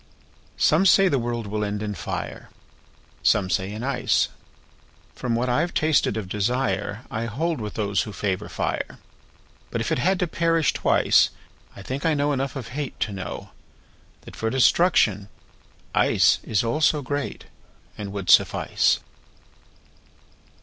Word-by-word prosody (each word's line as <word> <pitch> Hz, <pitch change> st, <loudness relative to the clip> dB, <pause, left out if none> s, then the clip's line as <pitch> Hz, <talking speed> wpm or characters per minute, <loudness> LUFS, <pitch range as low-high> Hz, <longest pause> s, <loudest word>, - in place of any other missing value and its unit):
SOME 170 Hz, +6 st, +4 dB
say 195 Hz, +2 st, +6 dB
the 140 Hz, -7 st, +1 dB
world 120 Hz, -1 st, -3 dB
will 105 Hz, +1 st, -2 dB
end 105 Hz, 0 st, -3 dB
in 105 Hz, -1 st, -3 dB
fire, -, -, -6 dB, 0.7 s
Some 95 Hz, -3 st, +2 dB
say 95 Hz, +2 st, 0 dB
in 110 Hz, +3 st, -6 dB
ice. 130 Hz, -2 st, +1 dB, 0.8 s
From 120 Hz, -2 st, -2 dB
what 120 Hz, +2 st, 0 dB
I've 150 Hz, +8 st, 0 dB
tasted 155 Hz, -8 st, +2 dB
of 105 Hz, -4 st, -4 dB
desireI 110 Hz, +2 st, -2 dB
hold 155 Hz, +5 st, -2 dB
with 105 Hz, -1 st, -6 dB
those 100 Hz, -2 st, 0 dB
who 105 Hz, -, -5 dB
favor 100 Hz, 0 st, -3 dB
fire. -, -, -3 dB, 0.7 s
But -, -, -3 dB
if -, -, -2 dB
it -, -, +1 dB
had 190 Hz, +8 st, +2 dB
to 180 Hz, -, 0 dB
perish 165 Hz, -1 st, +1 dB
twice,I 100 Hz, -, +1 dB
think 130 Hz, +6 st, -4 dB
I 160 Hz, -2 st, +2 dB
know 145 Hz, 0 st, +1 dB
enough 135 Hz, 0 st, -2 dB
of 125 Hz, -4 st, -6 dB
hateTo 130 Hz, -6 st, -4 dB
know 95 Hz, -2 st, -7 dB, 0.7 s
that -, -, -12 dB
for 115 Hz, -, -2 dB
destruction 120 Hz, -, +3 dB, 0.6 s
iceIs 110 Hz, -1 st, +3 dB
also 150 Hz, +3 st, +2 dB
greatAnd 140 Hz, -6 st, -7 dB
would 100 Hz, -2 st, -1 dB
suffice. -, -, +3 dB
120 Hz, 135 wpm, -24 LUFS, 105-145 Hz, 0.8 s, say